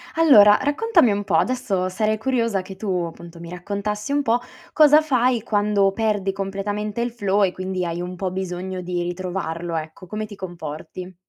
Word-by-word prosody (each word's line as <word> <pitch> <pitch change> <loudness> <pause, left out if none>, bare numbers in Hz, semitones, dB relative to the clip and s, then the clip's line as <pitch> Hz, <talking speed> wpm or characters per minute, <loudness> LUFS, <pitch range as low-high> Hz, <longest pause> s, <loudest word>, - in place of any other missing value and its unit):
Allora, 215 -11 +7
raccontami 290 - +3
un 205 0 -1
po', - - 0
adesso 215 -8 0
sarei 215 +3 0
curiosa 230 -4 0
che 190 +1 -10
tu 190 -4 -2
appunto 170 0 -10
mi 170 0 -9
raccontassi 200 +5 -4
un 285 0 +1
po' 235 -1 +2 0.3
cosa 305 0 +7
fai 255 -5 +1
quando 205 -2 +2
perdi 205 -2 0
completamente 200 +3 -3
il 240 - -1
flow 205 -3 +1
e 185 - +2
quindi 185 0 -3
hai 170 0 -3
un 180 +1 -5
po' 185 +1 -3
bisogno 185 0 -4
di 175 0 -3
ritrovarlo, 175 -2 -4
ecco. 160 +3 -6
Come 215 +3 -4
ti 210 -1 -11
comporti? 175 0 -8
195 Hz, 175 wpm, -22 LUFS, 180-220 Hz, 0.3 s, Allora